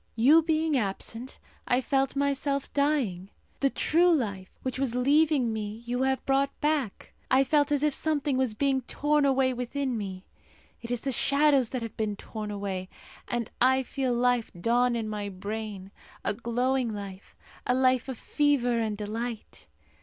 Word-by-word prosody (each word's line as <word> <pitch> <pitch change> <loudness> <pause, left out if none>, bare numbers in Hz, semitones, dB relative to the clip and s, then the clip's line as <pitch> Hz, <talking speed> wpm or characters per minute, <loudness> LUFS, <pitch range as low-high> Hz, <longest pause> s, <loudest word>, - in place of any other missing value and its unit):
You 275 +9 +6
being 315 -1 +1
absent, 225 +2 -3 0.3
I 245 - +3
felt 270 0 0
myself 280 0 -1
dying. 265 -11 0 0.3
The 275 - +3
true 345 +6 +3
life 200 - -1
which 260 0 -3
was 260 -3 -1
leaving 280 -1 +3
me 215 +1 -5
you 245 +1 -2
have 265 0 0
brought 275 +1 +1
back. 295 -8 -1 0.2
I 265 +1 +5
felt 290 +1 +2
as 290 0 +1
if 300 -2 +2
something 295 -3 0
was 255 -4 0
being 270 +2 +1
torn 295 +3 +1
away 265 -1 +2
within 250 +1 -2
me. 190 -3 -5 0.6
It 235 - -8
is 245 -1 -2
the 275 - -2
shadows 280 -1 +3
that 255 -3 -3
have 225 -2 -7
been 215 -2 -1
torn 215 +1 -7
away, 195 -2 -4 0.4
and 240 -2 -3
I 260 +1 +4
feel 260 0 -2
life 245 -1 +1
dawn 240 +5 +2
in 225 -2 -2
my 210 -1 -4
brain 200 0 -6 0.3
a - - +1
glowing 245 +2 0
life, 200 -2 -8 0.3
a 250 - +3
life 255 -1 +2
of 260 - -5
fever 265 -5 +1
and 215 -2 -1
delight. 220 - -5
250 Hz, 165 wpm, -28 LUFS, 220-275 Hz, 0.6 s, You